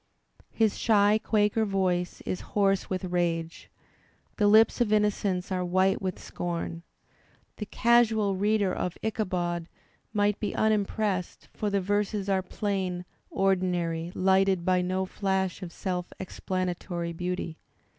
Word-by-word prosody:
His 220 -2 +1
shy 210 -1 +4
Quaker 210 +1 +2
voice 185 -3 0
is 185 - -4 0.2
hoarse 195 -2 +2
with 185 0 -2
rage, 170 -2 -2 0.7
the 210 - +3
lips 220 +4 +5
of 225 -3 +2
innocence 205 -3 +1
are 185 -1 0
white 185 +2 +2
with 185 -2 -2
scorn. 170 -1 -4 0.8
The 210 - -5
casual 220 -4 +3
reader 205 0 +1
of 180 - -3
'"Ichabod" 175 -6 -1 0.4
might 205 -1 +1
be 210 - -3
unimpressed, 210 -3 0
for 210 - -2
the 200 -1 +1
verses 205 +1 -1
are 190 -1 +2
plain, 185 -2 -3 0.2
ordinary, 180 -3 0
lighted 190 -1 +3
by 185 -1 +3
no 185 +1 -1
flash 190 -1 -1
of 180 -2 -6
self 180 0 -4
explanatory 180 -2 -3
beauty. 180 -1 -4
190 Hz, 125 wpm, -28 LUFS, 180-205 Hz, 0.8 s, lips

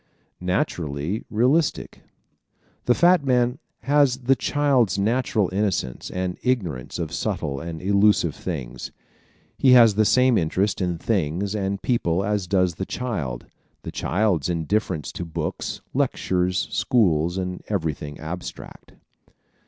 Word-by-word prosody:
Naturally 90 - -2
Realistic 130 +8 +1
¶ - - -41
The 120 - +4
fat 175 -2 +4
man 125 -1 +1 0.2
has 140 0 +3
the 130 +2 +3
child's 130 - +1
natural 110 -1 +1
innocence 95 - -1
and 90 -1 -3
ignorance 90 - -2
of 85 -3 -4
subtle 70 -2 -2
and 80 +2 -6
elusive 100 -4 +3
things. 65 -10 -6 0.7
He 130 -2 +6
has 115 -4 +7
the 110 +2 +3
same 125 +2 +4
interest 95 +4 0
in 90 -2 -1
things 95 0 -1
and 100 -1 -2
people 95 -7 +1
as 105 -3 -1
does 90 -1 +2
the 95 +4 -4
child; 80 - -4 0.4
the - - -6
child's 95 -5 0
indifference 85 0 -1
to - - -6
books, 80 -1 -4
lectures, 90 0 0
schools 90 - +2
and 90 -1 -4
everything 80 -6 -3
abstract. 85 +4 -8
95 Hz, 125 wpm, -23 LUFS, 85-115 Hz, 0.7 s, has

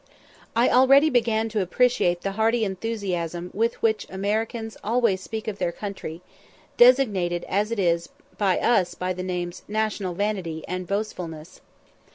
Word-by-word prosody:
I 235 +2 +4
already 275 +4 +6
began 225 -3 +2
to 215 -1 -1
appreciate 185 -3 +2
the 195 - -2
hearty 220 +2 +1
enthusiasm 185 -4 -3
with 230 +3 0
which 220 -1 +1
Americans 220 +3 -2
always 225 -4 +1
speak 220 +2 -6
of 210 -1 -4
their 170 - 0
country, 180 -4 -7 0.5
designated 210 -9 +4
as 205 +2 0
it 230 - -3
is 170 -3 +1 0.3
by 195 -3 +1
us 190 -7 +2
by 185 0 -2
the 180 - -6
names 180 -1 -4
"National 210 -4 -2
vanity," 185 -6 -2
and 185 0 -4
"Boastfulness." 180 -5 -5
200 Hz, 145 wpm, -24 LUFS, 180-225 Hz, 0.5 s, already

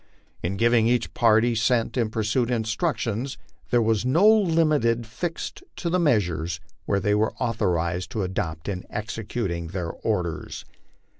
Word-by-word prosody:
In 95 +3 -2
giving 115 +1 +4
each 120 -1 +1
party 115 +1 +4
sent 115 +1 +1
in 115 -4 +1
pursuit 115 +3 0
instructions, 120 - -1 0.3
there 120 -2 +3
was 110 -1 +1
no 160 +11 +4
limit 155 - +3
fixed 165 - -5
to 170 - -3
the 180 - +2
measures 90 - +1 0.3
which 100 -1 +1
they 105 - +2
were 105 +1 +1
authorized 90 -7 0
to 110 -4 -1
adopt 80 -4 -3
in 95 -3 -3
executing 105 -5 -3
their 85 -1 -4
orders. 90 -8 -3
110 Hz, 140 wpm, -25 LUFS, 95-125 Hz, 0.3 s, giving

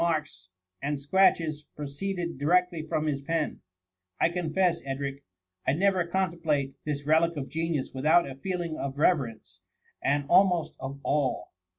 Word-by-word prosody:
marks 155 - -1 0.3
and 145 +1 -1
scratches 155 -1 +2
pro 150 - -5
ceeded 170 +2 -4
directly 175 +2 +2
from 155 0 -2
his 140 -3 -1
pen* 160 +2 -2 0.6
I - - +4
confess, 175 0 +1
Edric, 140 +1 -4 0.4
I 130 - +4
never 185 +1 +2
contemplate 165 -7 0
this 145 -1 -3
relic 160 +2 +3
of 135 -2 -4
genius 160 -3 -2
without 155 +6 +4
a 135 - -6
feeling 170 +2 -3
of 140 0 -4
reverence, 115 - 0 0.4
and 145 +1 +1
almost 180 -1 +4
of 135 +1 -6
awe. 140 -10 +1
155 Hz, 145 wpm, -28 LUFS, 140-170 Hz, 0.6 s, I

